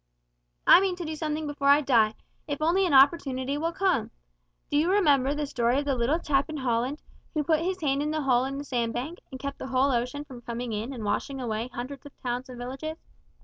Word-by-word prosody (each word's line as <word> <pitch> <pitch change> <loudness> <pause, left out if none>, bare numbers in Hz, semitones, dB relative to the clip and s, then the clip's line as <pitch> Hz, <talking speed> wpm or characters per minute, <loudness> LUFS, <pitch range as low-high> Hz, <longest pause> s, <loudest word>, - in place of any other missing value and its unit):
I - - +8
mean 385 -2 0
to 355 -1 -6
do 315 0 -4
something 310 0 -2
before 285 -1 -2
I 285 +1 +7
die, 225 -6 +3 0.3
if 285 -2 -3
only 350 +5 +3
an 325 - -1
opportunity 270 -1 +4
will 325 +3 -1
come! 360 - +1 0.6
Do 290 - +2
you 320 +4 +3
remember 290 -8 +3
the 295 0 -1
story 245 -2 +1
of 285 - 0
the 280 - +1
little 255 +5 +1
chap 280 -3 0
in 310 - -4
Holland, 255 +2 -1 0.3
who 305 - +1
put 315 +1 +2
his 370 +3 -2
hand 280 -2 +1
in 300 - -1
the 310 -1 -1
hole 255 -1 +3
in 275 +1 -4
the 285 - -4
sand 235 -4 -1
bank, 285 +9 -4
and 260 - -8
kept 280 0 -5
the - - -5
whole 265 +1 +2
ocean 250 +4 -1
from 255 -4 -11
coming 235 0 -4
in 215 +5 -3
and 240 -5 -6
washing 265 +6 -2
away 230 -2 -2
hundreds 255 +3 -6
of 285 - -17
towns 250 +1 -3
and 250 - -9
villages? 270 +6 -5
275 Hz, 230 wpm, -27 LUFS, 250-305 Hz, 0.6 s, I